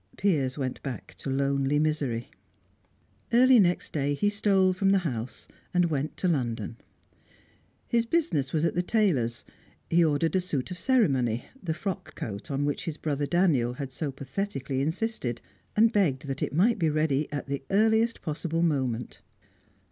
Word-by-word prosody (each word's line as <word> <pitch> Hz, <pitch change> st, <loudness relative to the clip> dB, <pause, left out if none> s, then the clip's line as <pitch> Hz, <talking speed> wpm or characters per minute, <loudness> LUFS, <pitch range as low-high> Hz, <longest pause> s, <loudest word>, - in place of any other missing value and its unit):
Piers 145 Hz, -9 st, +1 dB
went 130 Hz, -3 st, -3 dB
back 135 Hz, -3 st, -6 dB
to -, -, -4 dB
lonely 140 Hz, +1 st, +1 dB
misery. 145 Hz, -6 st, -1 dB, 1.0 s
Early 250 Hz, +1 st, +6 dB
next 180 Hz, -3 st, +1 dB
day 145 Hz, -1 st, 0 dB
he 205 Hz, +8 st, +2 dB
stole 195 Hz, -3 st, +3 dB
from 195 Hz, +1 st, +1 dB
the 195 Hz, -, +5 dB
house, 120 Hz, -4 st, -4 dB, 0.3 s
and 175 Hz, -2 st, +3 dB
went 145 Hz, 0 st, -2 dB
to 185 Hz, -, 0 dB
London. 120 Hz, -, -1 dB, 1.1 s
His 235 Hz, -1 st, +1 dB
business 165 Hz, -, 0 dB
was 160 Hz, 0 st, +1 dB
at -, -, +1 dB
the 175 Hz, -, +1 dB
tailor's; 165 Hz, -, +1 dB, 0.5 s
he 170 Hz, +1 st, +5 dB
ordered 160 Hz, +2 st, +1 dB
a 185 Hz, -, +3 dB
suit 155 Hz, -3 st, -3 dB
of 180 Hz, -, -6 dB
ceremony 135 Hz, -, +2 dB, 0.2 s
the 160 Hz, -4 st, -2 dB
frock 195 Hz, +1 st, -5 dB
coat 100 Hz, -2 st, -6 dB
on 140 Hz, 0 st, 0 dB
which 145 Hz, -, -2 dB
his 160 Hz, -2 st, -4 dB
brother 145 Hz, -2 st, -2 dB
Daniel 150 Hz, -10 st, +2 dB
had 135 Hz, 0 st, -6 dB
so 140 Hz, +2 st, -3 dB
pathetically 135 Hz, -1 st, -3 dB
insisted 160 Hz, -, -2 dB, 0.4 s
and 225 Hz, +2 st, +4 dB
begged 150 Hz, -10 st, +1 dB
that 135 Hz, -1 st, -4 dB
it -, -, -1 dB
might 205 Hz, +9 st, +3 dB
be 165 Hz, -3 st, +2 dB
ready 155 Hz, -1 st, 0 dB
at 145 Hz, -, -3 dB
the 140 Hz, 0 st, -3 dB
earliest 220 Hz, +3 st, +2 dB
possible 165 Hz, +1 st, -1 dB
moment. 130 Hz, -7 st, -1 dB
155 Hz, 165 wpm, -27 LUFS, 135-190 Hz, 1.1 s, Early